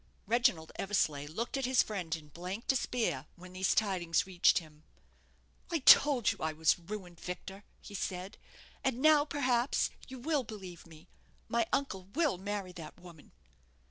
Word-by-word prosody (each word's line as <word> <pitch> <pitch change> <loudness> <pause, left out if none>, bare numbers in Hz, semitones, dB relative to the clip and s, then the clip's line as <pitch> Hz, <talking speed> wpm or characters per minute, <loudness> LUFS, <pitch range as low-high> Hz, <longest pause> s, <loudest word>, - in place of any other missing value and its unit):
Reginald 205 -8 +2
Eversleigh 155 -8 0
looked 230 - -3
at 270 - -1
his 255 0 +4
friend 180 -6 -3
in 150 -2 -12
blank 180 - -6
despair 230 - 0
when 180 +1 -13
these 185 0 +1
tidings 185 -6 +1
reached 185 -2 +4
him. 155 -3 -6 0.9
"I 340 - +1
told 275 -4 +6
you - - -8
I 160 0 -1
was 160 +2 +2
ruined, 175 -1 -8
Victor," 190 +2 -7 0.2
he 205 - -11
said; 185 0 -4 0.4
"and 260 -2 0
now, 300 0 +5
perhaps, 260 -4 +1 0.2
you 260 - -8
will 290 +2 0
believe 190 -7 -9
me. 160 -1 -15 0.4
My 230 -1 +1
uncle 190 -10 -1
will 300 - +1
marry 200 -1 -4
that 165 -1 -10
woman." 175 -4 -14
195 Hz, 155 wpm, -32 LUFS, 170-245 Hz, 0.9 s, told